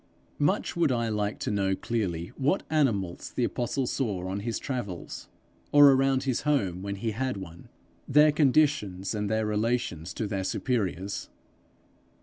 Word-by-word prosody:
Much 145 0 +1
would 170 -5 +2
I 115 -2 0
like 105 -1 -1
to - - -1
know 95 -2 +1
clearly 90 -7 -2
what 145 +8 +1
animals 105 - 0
the 125 - +1
apostle 125 +2 -1
saw 105 -9 -2
on 95 +2 -3
his 115 +2 -2
travels, 110 -10 -5 0.4
or 145 -1 +8
around 135 0 +2
his 130 -3 0
home 100 - 0
when 100 0 -4
he 110 +3 -2
had 130 +1 -2
one 85 -3 -10 0.4
their 150 +2 +6
conditions, 135 - +2
and 105 -1 -2
their 110 0 +1
relations 105 -6 -1
to 110 - -2
their 100 -2 -2
superiors. 100 -3 -2
110 Hz, 150 wpm, -28 LUFS, 95-135 Hz, 0.4 s, or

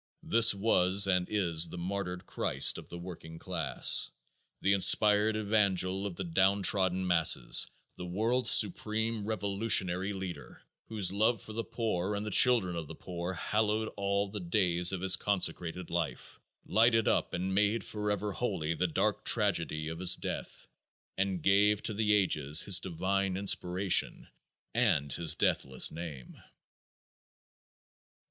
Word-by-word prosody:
This 115 -2 +5
was 100 -1 +2
and 90 -2 0
is 85 -5 +1
the 90 - -9
martyred 90 0 -5
Christ 65 -4 +1
of - - -15
the 85 - -8
working 85 -2 -10
class, 80 -5 +1 0.5
the 100 - +1
inspired 105 +2 +4
evangel 100 -3 -1
of 95 - -8
the 95 - -5
downtrodden 95 +1 0
masses, 85 -8 +4 0.3
the 90 - -8
world's 115 +8 +1
supreme 110 +2 +2
revolutionary 100 -2 0
leader, 95 -6 -9 0.2
whose 105 -5 +1
love 110 +3 0
for 110 - -11
the 115 +1 -4
poor 105 -5 -3
and 100 +1 -5
the 105 - -5
children 110 -7 +4
of 80 -3 -6
the - - -10
poor 90 +1 -7
hallowed 110 +3 -2
all 100 0 -2
the 105 +1 -7
days 90 -1 0
of 95 -2 -5
his 95 0 +5
consecrated 90 -3 -2
life, 85 -2 -5 0.3
lighted 115 0 +2
up - - 0
and 95 +2 -4
made 105 +2 0
forever 105 -1 -4
holy 95 -8 -3
the 90 +2 -2
dark 80 - -2
tragedy 75 0 -1
of 80 +1 -7
his 90 -1 +5
death, - - -8 0.5
and 95 -4 -3
gave 100 +1 +2
to 110 - -2
the 105 0 -1
ages 80 -7 +2
his 95 -3 +5
divine 95 +2 -3
inspiration 95 -1 0 0.5
and 90 - 0
his 85 -2 +1
deathless 65 -1 +1
name. 80 -6 -10
95 Hz, 140 wpm, -29 LUFS, 90-105 Hz, 0.5 s, This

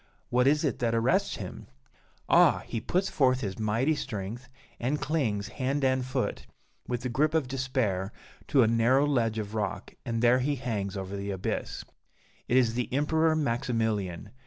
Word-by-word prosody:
What 125 +1 +3
is 150 +2 +3
it 145 -6 -1
that 115 -1 +1
arrests 115 +3 +2
him? - - -8 0.6
Ah! - - +5
he 115 - -4
puts 185 - 0
forth 130 -5 +2
his 100 -1 -4
mighty 115 +8 +1
strength, 120 -2 -5 0.3
and 135 +5 0
clings, 115 -10 -1
hand 135 +4 -2
and 130 0 +2
foot, 130 0 -3 0.4
with 120 -1 -2
the 125 - -2
grip 150 +6 +1
of 155 -5 +1
despair, 125 -7 -1 0.4
to 135 -3 +5
a - - +3
narrow 120 +5 +3
ledge 115 -6 +1
of 105 -1 -4
rock, 105 -2 -3
and 115 0 -2
there 120 +2 +5
he 145 +3 0
hangs 105 -6 -3
over 95 +1 -5
the 100 0 -4
abyss! 95 -2 -3 0.6
It 125 - +3
is 120 -3 +3
the 125 0 -2
Emperor 160 +4 +2
Maximilian! 115 - -1
125 Hz, 170 wpm, -28 LUFS, 110-135 Hz, 0.6 s, Ah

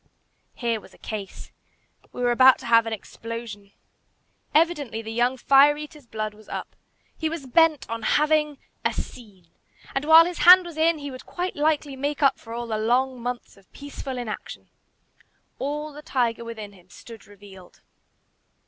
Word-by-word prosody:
Here 230 -3 -2
was - - -17
a - - -20
case. 205 -3 -8 0.6
We 245 - -5
were 245 - +3
about 260 +2 +6
to - - -12
have 230 -1 +4
an - - -3
explosion. 220 -1 -8 0.8
Evidently 295 -8 +1
the 220 - -6
young 245 +3 +1
fire 280 +3 +5
eater's 300 -3 -10
blood 215 -1 -4
was 215 0 -18
up. - - -6 0.4
He 320 - -2
was 320 -4 -6
bent 310 +2 +3
on 230 0 -5 0.2
having 300 -1 +1 0.3
"a - - +1
scene;" 195 -8 -9 0.4
and, 270 +2 -2
while 320 +1 +8
his 350 0 -5
hand 365 +1 +8
was 340 -2 -9
in, 320 +1 +2
he 285 -1 -7
would 255 - -11
quite 360 +1 -4
likely 295 -2 0
make 285 +2 -3
up 275 -1 +3
for 225 - -13
all 235 +1 -4
the 220 -2 -3
long 250 +3 0
months 245 -2 -6
of 195 -2 -24
peaceful 280 -2 -7
inaction. 235 -3 -7 0.9
All 295 +2 -4
the 295 - -10
tiger 240 -6 -1
within 220 -3 -8
him 185 -1 -21
stood 230 +4 -13
revealed. 200 -3 -16
250 Hz, 170 wpm, -24 LUFS, 225-295 Hz, 0.9 s, while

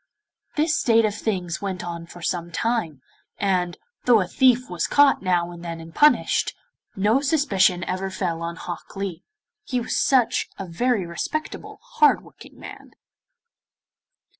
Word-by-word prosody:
This 310 +1 +2
state 230 -2 +4
of 210 - 0
things 185 -5 -3
went 190 -3 -4
on 170 -1 -6
for 175 0 -12
some 170 +1 -2
time, 170 - -2 0.3
and, 180 -3 0 0.3
though 240 -3 +6
a 185 - 0
thief 250 +5 +3
was 175 -3 -2
caught 285 -1 +4
now 175 -2 0
and 175 0 -10
then 165 -1 -5
and 165 0 -11
punished, 300 0 +3 0.4
no 210 +6 +3
suspicion 205 - +2
ever 185 +2 -3
fell 175 -3 -3
on 170 0 -4
Hok 175 0 -8
Lee, 195 -4 -5 0.4
he 250 - -2
was 240 - -3
such 255 -5 +2
a 195 - -5
very 205 +4 0
respectable, 240 - -5
hard 485 -2 +3
working - - -16
man. - - -11
190 Hz, 150 wpm, -23 LUFS, 175-245 Hz, 0.4 s, though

